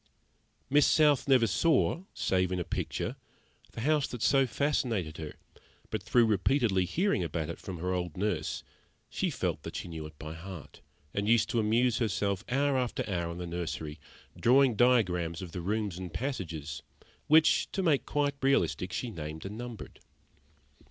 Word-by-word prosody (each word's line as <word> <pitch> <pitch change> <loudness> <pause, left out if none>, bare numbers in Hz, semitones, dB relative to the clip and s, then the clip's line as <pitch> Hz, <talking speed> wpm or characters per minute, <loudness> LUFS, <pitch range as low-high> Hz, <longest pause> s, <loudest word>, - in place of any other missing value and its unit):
Miss 145 +1 +5
South 150 -4 +4
never 130 -4 +5
saw 165 - +2
save 90 -1 +1
in 90 - -1
a - - -1
picture - - -3 0.6
the 115 - -6
house 150 +2 +2
that 120 -3 -5
so 135 -1 +4
fascinated 115 - -1
her; 80 -2 -6 0.6
but - - -2
through 120 -2 +4
repeatedly 105 -2 +2
hearing 175 - +1
about 80 -1 -3
it - - -9
from 95 -3 -6
her 90 +3 -2
old 90 -3 -3
nurse, 90 -6 -1 0.5
she - - 0
felt - - -2
that - - -8
she - - -4
knew 80 -2 -6
it 75 -1 -16
by 80 0 -7
heart, 85 -1 -10 0.3
and 100 +1 -1
used 115 -1 +4
to 120 - +1
amuse 115 +2 +2
herself 100 -4 0
hour 135 +1 +2
after 125 -2 -2
hour 85 -4 -2
in 85 - -7
the 90 - -4
nursery, 85 -3 -4 0.4
drawing 130 0 +4
diagrams 90 -9 +2
of 90 -3 -7
the 90 - -5
rooms 100 -1 -2
and 90 -2 -6
passages, 80 - -4 0.5
which, 155 +1 +5
to 195 - -1
make 155 -6 +3
quite 145 0 0
realistic, 135 -8 +1
she 120 +6 -3
named 80 -3 -6
and 100 +2 -5
numbered. 120 -1 -8
105 Hz, 170 wpm, -30 LUFS, 85-130 Hz, 0.6 s, Miss